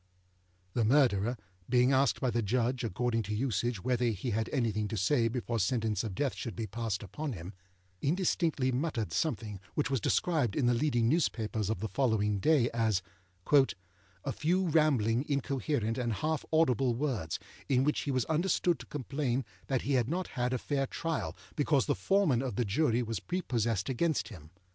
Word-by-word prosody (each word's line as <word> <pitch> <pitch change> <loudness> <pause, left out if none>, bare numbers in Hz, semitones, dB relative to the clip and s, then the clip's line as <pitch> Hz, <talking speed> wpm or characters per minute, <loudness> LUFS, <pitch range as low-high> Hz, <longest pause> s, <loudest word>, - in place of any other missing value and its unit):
The 120 - +1
Murderer, 120 -2 +3 0.3
being 125 +2 +4
asked 135 +1 +3
by 130 - 0
the 120 - 0
Judge, 120 +4 0
according 115 +2 0
to 105 0 -3
usage, 120 -3 -1
whether 125 0 +1
he 115 +2 -2
had 110 +1 -1
anything 110 -6 0
to 110 - -4
say 115 +5 +2
before 120 -1 -2
sentence 110 -1 0
of 105 -5 -4
Death 140 +3 0
should 115 - -6
be 115 - -3
passed 110 -1 -3
upon 145 - -4
him, 90 0 -8 0.5
indistinctly 160 -4 +1
muttered 125 -5 -2
something 110 -9 -1 0.2
which 150 - 0
was 135 -5 +1
described 145 - +1
in 135 - +1
the 120 - +4
leading 120 -3 +2
newspapers 110 - 0
of 110 - -2
the 110 - -1
following 105 -3 +1
day 145 +1 +4
as 110 -5 +1 0.4
âa 140 -2 +4 0.6
few 180 +5 +1
rambling, 135 -7 +3
incoherent, 135 -4 -1
and 120 -2 0
half 155 +6 -1
audible 130 -6 +3
words, 120 - -2 0.3
in 130 -1 +3
which 150 +2 +1
he - - -4
was 130 -3 +1
understood 170 +1 +1
to - - -10
complain 135 -2 -2 0.2
that 130 -3 0
he 140 - 0
had 120 -3 +2
not 180 +3 -2
had 125 0 -1
a 130 - +1
fair 135 +2 -1
trial, 125 - -3 0.2
because 145 -3 +2
the - - +2
Foreman 150 - +2
of 130 -2 -3
the 120 - 0
Jury 120 +3 +1
was 115 -1 -3
prepossessed 120 - -1
against 135 -2 0
him. 80 -9 -12
125 Hz, 175 wpm, -31 LUFS, 110-145 Hz, 0.6 s, being